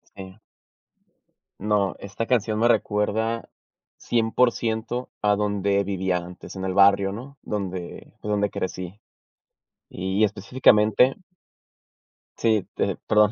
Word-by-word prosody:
Si. 95 -1 -10 1.2
No, 100 -2 +1
esta 100 +3 -4
canción 110 -3 +1
me 115 +2 +3
recuerda 110 +1 0 0.5
100% 115 0 0
a 105 -1 +3
donde 100 -1 +1
vivía 95 -2 -1
antes, 90 +2 -9
en 95 - -5
el 95 -1 -1
barrio, 100 0 +5
¿no?, 130 +7 -9
donde 95 -4 -5
donde 105 -1 0
crecí. 95 +2 -5 0.9
Y 95 +3 -1
específicamente 110 +3 +3 1.2
sí, 110 -4 +1
pe - - -1
perdón, 105 -1 +4
105 Hz, 105 wpm, -24 LUFS, 95-110 Hz, 1.2 s, barrio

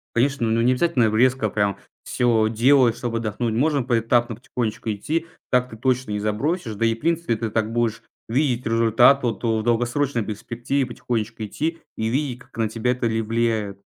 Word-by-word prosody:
Конечно. 130 0 +1
Ну, 115 +1 +2
не 120 +2 +4
обязательно 125 -6 +2
резко 125 -1 +3
прям 100 -1 0 0.3
всё 115 -3 +2
делать, 120 +1 +4
чтоб 120 -2 -3
отдохнуть. 115 0 -2
Можно 140 +3 +1
поэтапно 120 0 +1
потихонечку 115 -2 -3
идти. 155 +11 -2 0.2
Так 125 -1 +2
ты 110 - -10
точно 130 -1 0
не 105 - -1
забросишь. 110 - -2
Да 115 - 0
и, 115 0 +2
в - - -18
принципе, 165 -4 0
ты 110 0 -3
так 110 0 -1
будешь 115 -1 0 0.3
видеть 125 0 0
результат. 115 +4 +4
Вот, 120 0 -2
о 110 -1 +1
в - - -3
долгосрочной 120 +2 0
перспективе 120 +6 -2
потихонечку 115 -2 -4
идти 160 +10 -3 0.2
и 110 - -2
видеть, 130 +1 -1
как 130 - -18
на 110 -2 0
тебя 115 +2 -1
это 125 -1 -1
ли 115 0 0
влияет. 110 -3 -1
115 Hz, 185 wpm, -23 LUFS, 110-130 Hz, 0.3 s, не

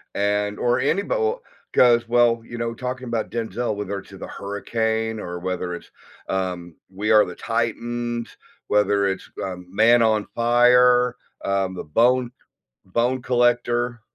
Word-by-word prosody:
and 105 0 0
or 120 0 +2
anybo 185 +8 0
well, 475 0 0 0.3
'cause, 120 -1 +5
well, 120 -1 +3
you 120 0 -9
know, 115 0 -2
talking 125 +1 -5
about 115 -2 -2
Denzel, 115 -1 -3
whether 100 -1 -4
it's - - -16
in - - -11
The - - -6
Hurricane, 110 +2 -2
or 90 -3 -5
whether 90 -1 -3
it's, - - -12 0.4
um, 90 -3 -3
We 100 +3 -2
Are 105 -1 +7
the 90 - -8
Titans, 120 +1 -3 0.3
whether 100 -1 +2
it's, 95 - -4
um, 90 -1 -6
Man 115 +5 +4
on 110 -2 +2
Fire, 125 +1 +4 0.3
um, 95 -1 0
The - - -5
Bone 120 +9 +2 0.5
Bone 120 +6 0
Collector 120 -1 +1
115 Hz, 150 wpm, -23 LUFS, 100-120 Hz, 0.5 s, Are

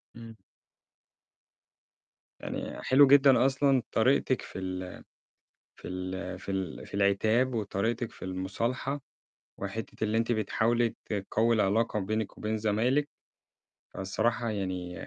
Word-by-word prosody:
إمم. 115 -1 -11 2.0
يعني - - -5
حلو 135 +1 +6
جدًا 135 -2 +6
أصلًا 135 -1 +3
طريقتِك 130 +2 +2
في - - -8
ال 95 -1 -5 0.7
في - - -9
ال 90 0 -5
في 100 - -7
ال 95 -4 -4
في - - -13
العتاب، 110 +6 +2
وطريقتِك 110 +2 -1
في - - -10
المُصالحة، 115 +9 -2 0.6
وحتّة 105 +3 -5
اللي 110 +1 +1
أنتِ 115 +1 +1
بتحاولي 115 +2 +1
تقوّي 110 +3 +1
العلاقة 105 +1 +1
بينِك 110 +2 -3
وبين 110 0 -2
زمايلِك، 120 +7 +1 0.9
فالصراحة 115 +4 -1
يعني 90 -3 -4
110 Hz, 110 wpm, -29 LUFS, 95-120 Hz, 2.0 s, حلو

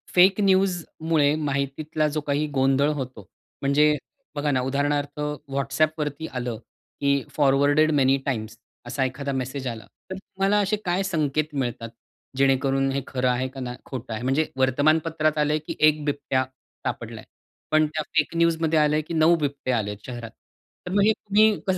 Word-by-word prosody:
Fake 190 +3 +6
न्यूजमुळे 175 -6 +2
माहितीतला 150 +1 -1
जो 150 0 -2
काही 145 +1 0
गोंधळ 135 +2 +3
होतो 130 -7 -6 0.4
म्हणजे 150 +2 +4 0.4
बघा 145 0 0
ना, 130 -2 +1
उदाहरणार्थ 145 +2 -1 0.3
WhatsApp 140 +3 +1
वरती 150 +1 -3
आलं 125 -4 -4 0.4
की 140 -1 +2
फॉरवर्डेड 145 +2 +4
मेनी 135 -2 +3
टाइम्स 110 -5 -3 0.3
असा 130 +2 -1
एखादा 140 +2 -3
मेसेज 130 +1 -3
आला, 115 -3 -5 0.3
तर 190 - -2
तुम्हाला 195 +2 0
असे 205 +1 +1
काय 180 +2 +1
संकेत 155 -4 -1
मिळतात? 120 -3 -3 0.5
जेणेकरून 135 0 +2
हे 135 +1 -1
खरं 130 -1 0
आहे 125 +1 0
का 135 - -10
नाही 125 -1 -5
खोटं 125 -3 -6
आहे. 110 +2 -5
म्हणजे 135 +5 +2
वर्तमानपत्रात 155 +4 +2
आलंय 150 0 +2
की - - -4
1 155 0 +4
बिबट्या 140 -2 0 0.4
सापडलाय. - - -5 0.5
पण 155 0 +4
त्या 155 +1 -3
फेक 150 +1 +1
न्यूज 170 -1 +3
मध्ये 160 -1 +2
आलंय 150 0 +3
की 155 +2 -8
9 160 +1 +5
बिबट्या 140 -4 -1
आलेत 105 -2 -3
शहरात. 120 -3 -7 0.5
तर 180 - -5
मग 200 +2 +3
हे 220 - +5
तुम्ही 210 +1 +3
कसं 190 -1 +2
145 Hz, 165 wpm, -24 LUFS, 135-155 Hz, 0.5 s, फेक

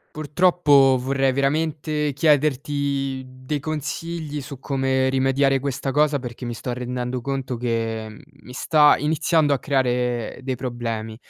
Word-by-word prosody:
Purtroppo 150 -4 +4
vorrei 135 +1 +1
veramente 150 +2 0
chiederti 140 -2 +1
dei 130 +3 -5
consigli 155 +1 -4
su 140 0 -9
come 130 -1 0
rimediare 135 +1 +2
questa 135 0 -3
cosa 150 0 +2
perché 125 0 -7
mi 120 - -3
sto 120 +1 -5
rendendo 125 0 -3
conto 135 -1 -3
che 115 -2 -3 0.2
mi 125 - -12
sta 150 +3 +4
iniziando 155 0 +2
a 135 - -3
creare 125 -4 -1
dei 130 -1 -3
problemi. 115 -3 -4
135 Hz, 125 wpm, -22 LUFS, 125-145 Hz, 0.2 s, Purtroppo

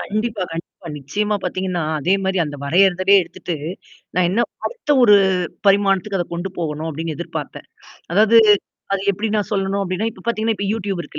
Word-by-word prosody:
கண்டிப்பா, 215 -1 -2
கண்டிப்பா. 165 +2 -8
நிச்சயமா 205 +10 -2
பாத்தீங்கன்னா, 180 -1 -2 0.2
அதே 180 +7 +2
மாரி 190 0 0
அந்த 145 -1 -6
வரையதுலே 185 +4 +4
எடுத்துட்டு, 175 0 -6 0.6
நான் 180 -1 +3
என்ன 215 - +1 0.3
அடுத்த 470 -11 -5
ஒரு 210 -4 +7 0.5
பரிமாணத்துக்கு 195 0 +3
அத 175 - 0
கொண்டு 175 +3 -4
போகணும். 160 -1 -3
அப்படின்னு 160 +1 -4
எதிர்பார்த்தேன். - - -6 0.4
அதாவது 215 +4 +6 0.5
அது 195 -1 0
எப்படி 205 +3 -2
நான் 205 -3 -1
சொல்லணும் 195 -1 0
அப்டின்னா, 190 +4 -1
இப்ப 190 - -15
பாத்தீங்கன்னா, 225 -1 0
இப்ப 200 +1 -3
YouTube 200 -4 -3
இருக்கு - - -9
195 Hz, 160 wpm, -20 LUFS, 175-210 Hz, 0.6 s, ஒரு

